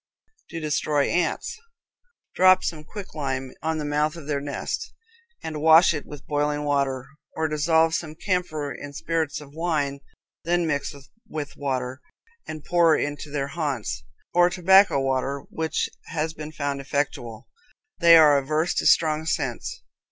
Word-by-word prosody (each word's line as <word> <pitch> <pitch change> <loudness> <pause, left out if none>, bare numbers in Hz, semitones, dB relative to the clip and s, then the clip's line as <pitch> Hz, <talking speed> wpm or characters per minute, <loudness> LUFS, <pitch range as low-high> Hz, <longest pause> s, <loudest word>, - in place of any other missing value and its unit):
To 165 - -5
Destroy 150 -2 +1
Ants. 175 - -1 0.7
Drop 185 +1 +5
some 155 -3 -3
quicklime 140 -9 -5
on 160 0 -1
the 150 - -3
mouth 150 +1 0
of 165 -4 -9
their 145 -1 -1
nest, 145 - -4 0.5
and 155 -2 -4
wash 160 +3 +7
it 150 - -5
with 145 -2 -10
boiling 150 0 0
water, 140 -3 0 0.3
or 160 0 0
dissolve 160 +2 +2
some 155 -2 -3
camphor 155 -6 -2
in 145 0 -9
spirits 160 -1 -2
of 145 -1 -13
wine, 150 -4 -1 0.4
then 175 +1 +1
mix 145 -2 -2 0.3
with 150 -2 -5
water, 130 -1 -3 0.5
and 155 -1 -7
pour 170 -2 +4
into 145 +1 -3
their 140 -1 -2
haunts; 135 - -3 0.3
or 175 0 +5
tobacco 190 -2 +5
water, 135 +1 -1
which 160 0 -1 0.2
has 160 0 -2
been 155 -1 -8
found 140 -2 -3
effectual. 135 -5 -3 0.5
They 170 -1 +8
are 150 -3 +7
averse 155 +5 0
to - - +2
strong 155 0 +3
scents. - - -3
150 Hz, 145 wpm, -25 LUFS, 140-165 Hz, 0.7 s, They